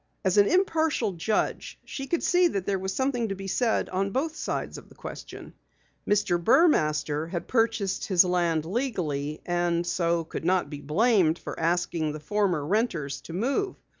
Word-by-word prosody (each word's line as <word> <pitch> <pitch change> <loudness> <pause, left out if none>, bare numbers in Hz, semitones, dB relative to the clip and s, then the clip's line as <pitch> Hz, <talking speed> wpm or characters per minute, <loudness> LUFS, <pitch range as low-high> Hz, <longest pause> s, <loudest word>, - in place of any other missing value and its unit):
As 190 +2 +4
an 200 - +6
impartial 320 - +1
judge 190 +5 -2
she 270 -1 -6
could 340 - -1
see 360 0 +4
that 195 - -3
there 195 -1 0
was 190 +1 -3
something 245 -2 -1
to 195 - -2
be 195 0 -8
said 225 +4 +1
on 195 +2 -1
both 300 +9 -2
sides - - -4
of - - -18
the - - -17
question. - - -9 0.6
Mr. 175 -4 +2
Burmaster 155 - +3
had 170 -1 -4
purchased 225 -5 0
his 185 -2 +5
land 170 -3 +1
legally, 160 - -2
and 175 -1 0
so 170 -1 0
could 160 - -6
not 180 0 +1
be 145 -1 -6
blamed 180 - +3
for - - -7
asking 165 -2 0
the 155 - -6
former 180 -2 0
renters 160 - -1
to 165 - -10
move. 275 - -1
185 Hz, 170 wpm, -27 LUFS, 165-230 Hz, 0.6 s, an